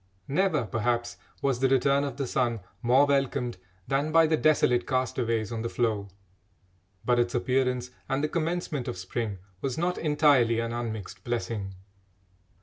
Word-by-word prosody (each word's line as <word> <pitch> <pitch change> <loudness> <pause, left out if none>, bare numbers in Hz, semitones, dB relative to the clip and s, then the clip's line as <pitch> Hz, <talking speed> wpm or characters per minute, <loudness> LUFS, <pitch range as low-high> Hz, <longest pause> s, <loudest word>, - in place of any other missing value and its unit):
Never, 155 -4 +1
perhaps, 120 +2 -1 0.3
was 135 -3 +1
the 135 0 +3
return 140 +2 +3
of 140 - -4
the 140 - -1
sun 120 -3 0 0.2
more 130 +4 +5
welcomed 135 -5 0 0.3
than 140 +3 0
by 165 0 +6
the 160 0 +3
desolate 150 -6 +3
castaways 120 -4 0
on 115 -1 -3
the 115 - -2
floe. 110 -5 0 1.0
But 120 -1 +3
its 120 0 +1
appearance 125 0 0 0.2
and 135 +1 0
the - - +2
commencement 160 -5 -2
of 120 - -4
spring 100 +3 -3 0.2
was 130 -3 -2
not 175 +2 0
entirely 145 -7 +3
an 115 0 -2
unmixed 110 -5 -5
blessing. 115 -5 -3
125 Hz, 150 wpm, -28 LUFS, 115-140 Hz, 1.0 s, by